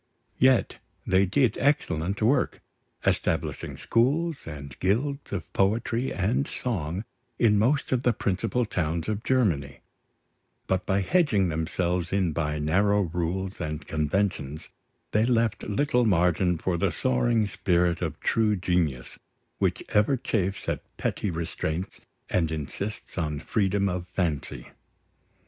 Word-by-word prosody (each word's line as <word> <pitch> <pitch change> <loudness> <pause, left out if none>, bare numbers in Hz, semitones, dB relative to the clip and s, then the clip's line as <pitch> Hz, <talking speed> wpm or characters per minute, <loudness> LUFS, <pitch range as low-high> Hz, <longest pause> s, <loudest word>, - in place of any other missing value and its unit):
Yet 130 -1 +3 0.3
they 95 +1 +3
did 120 +3 +2
excellent 100 - +1
work, 125 +6 +2 0.5
establishing - - -1
schools 145 - +1
and 70 -4 -7
guilds 140 +9 0
of 85 -6 -5
poetry 115 +5 +1
and 105 +9 0
song 95 -4 -3 0.3
in 105 -3 +4
most 130 +6 +1
of 130 -2 +2
the 125 - +3
principal 105 +4 0
towns 85 -5 -2
of 110 0 -2
Germany; 80 - +1 0.8
but 95 -1 -1
by 95 +1 +2
hedging 105 - +2
themselves 85 +2 -1
in 95 -4 +1
by 75 -1 -1
narrow 100 +7 +2
rules 90 +3 -3
and 75 0 -4
conventions, 80 -2 -1 0.4
they 105 - +3
left 115 -2 +1
little 125 +4 +1
margin 90 -1 +3
for 85 +2 -1
the 95 0 +1
soaring 120 -3 +2
spirit 90 -3 +1
of - - -3
true 110 -2 +2
genius, 85 -9 -1 0.4
which - - 0
ever 105 +6 +3
chafes 95 -5 -2
at - - -1 0.2
petty 105 - -1
restraints, 80 +1 -3 0.3
and 85 -3 +1
insists 90 - -5
on 75 -3 -2
freedom 100 +3 +1
of 90 -1 -3
fancy. 85 -6 -3
95 Hz, 125 wpm, -27 LUFS, 85-115 Hz, 0.8 s, in